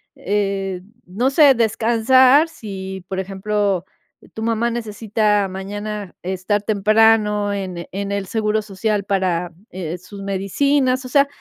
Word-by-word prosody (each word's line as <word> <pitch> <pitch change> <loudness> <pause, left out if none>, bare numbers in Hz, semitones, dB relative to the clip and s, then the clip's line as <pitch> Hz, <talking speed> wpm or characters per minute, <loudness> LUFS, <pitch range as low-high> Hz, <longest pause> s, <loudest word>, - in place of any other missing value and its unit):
eh, 195 -2 -2 0.2
no 210 +9 0
sé, 280 -1 +6
descansar 240 +6 +4
si, 190 - -7
por 190 0 -3
ejemplo, 195 -1 -1 0.5
tu 220 - -5
mamá 230 +1 +1
necesita, 215 -3 0
mañana 205 +1 -6
estar 190 +3 -1
temprano 210 0 +3
en 185 -3 -5
en 200 +1 -4
el 200 -1 -2
seguro 215 0 0
social, 210 +1 -1
eh, - - -13
para 185 -3 -1 0.5
sus 200 +3 -11
medicinas. 255 +7 0
O - - -7
sea, 280 +2 +4
205 Hz, 125 wpm, -20 LUFS, 195-225 Hz, 0.5 s, sé